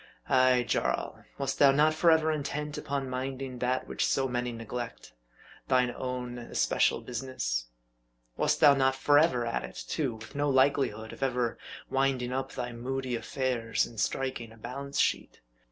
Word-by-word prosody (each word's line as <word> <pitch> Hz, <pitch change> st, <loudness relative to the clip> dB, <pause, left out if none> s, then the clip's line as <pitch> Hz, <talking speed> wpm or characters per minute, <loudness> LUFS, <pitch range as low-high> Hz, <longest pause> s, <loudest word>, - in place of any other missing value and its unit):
Ay, 130 Hz, -1 st, +4 dB
Jarl! -, -, -1 dB
wast 135 Hz, -1 st, -2 dB
thou 140 Hz, -1 st, +7 dB
not 150 Hz, +3 st, +4 dB
forever 160 Hz, -1 st, +4 dB
intent 150 Hz, 0 st, -3 dB
upon 140 Hz, -3 st, -3 dB
minding 130 Hz, 0 st, -4 dB
that 125 Hz, +1 st, 0 dB
which -, -, -1 dB
so 135 Hz, -1 st, +1 dB
many 125 Hz, -1 st, -2 dB
neglect 115 Hz, -, -6 dB, 0.5 s
thine 125 Hz, -2 st, +3 dB
own 125 Hz, -1 st, -4 dB
especial 90 Hz, -, +1 dB
business? 90 Hz, -, -3 dB, 0.7 s
Wast -, -, +1 dB
thou 145 Hz, -, +8 dB
not 135 Hz, -1 st, +2 dB
forever 140 Hz, -2 st, +3 dB
at 115 Hz, -, -2 dB
it, 60 Hz, 0 st, -7 dB
too, 135 Hz, -7 st, -1 dB
with 110 Hz, 0 st, -11 dB
no 145 Hz, 0 st, 0 dB
likelihood 130 Hz, -5 st, +2 dB
of -, -, -12 dB
ever 125 Hz, -3 st, 0 dB, 0.3 s
winding 135 Hz, -2 st, 0 dB
up 135 Hz, +1 st, -3 dB
thy 125 Hz, -1 st, -4 dB
moody 130 Hz, +1 st, -3 dB
affairs, 115 Hz, -1 st, -1 dB
and 115 Hz, -, -10 dB
striking 120 Hz, 0 st, -2 dB
a 115 Hz, -, -15 dB
balance 140 Hz, +5 st, -5 dB
sheet -, -, 0 dB
130 Hz, 155 wpm, -29 LUFS, 120-135 Hz, 0.7 s, thou